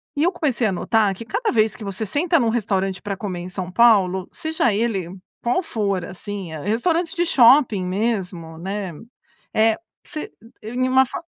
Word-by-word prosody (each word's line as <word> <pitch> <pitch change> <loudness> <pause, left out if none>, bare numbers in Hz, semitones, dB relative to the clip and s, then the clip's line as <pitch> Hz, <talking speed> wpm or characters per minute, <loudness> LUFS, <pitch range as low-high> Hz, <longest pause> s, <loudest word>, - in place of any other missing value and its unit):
e 290 - -1
eu 350 - +3
comecei 275 - 0
a - - 0
notar 210 +2 +1
que 230 - -9
cada 465 - -1
vez 220 -2 +2
que 220 - -9
você 200 +2 -3
senta 325 - +1
num 235 -3 +2
restaurante 195 -5 -1
para 200 -2 -4
comer 185 -3 -4
em 175 +1 -6
São 185 -1 -5
Paulo, 190 -4 +4
seja 315 -7 0
ele 200 -5 -1 0.3
qual 245 +9 +1
for, 200 - -1
assim, 195 -2 -6
é 155 - -5
restaurante 320 - 0
de 345 0 +1
shopping 245 - +5
mesmo, 185 -4 -2
né, 195 0 -4 0.6
eh, 220 0 +4 0.3
você 310 -3 -6 0.3
em 245 +4 -1
uma 260 +1 +5
fa 265 - -7
215 Hz, 180 wpm, -22 LUFS, 190-255 Hz, 0.6 s, shopping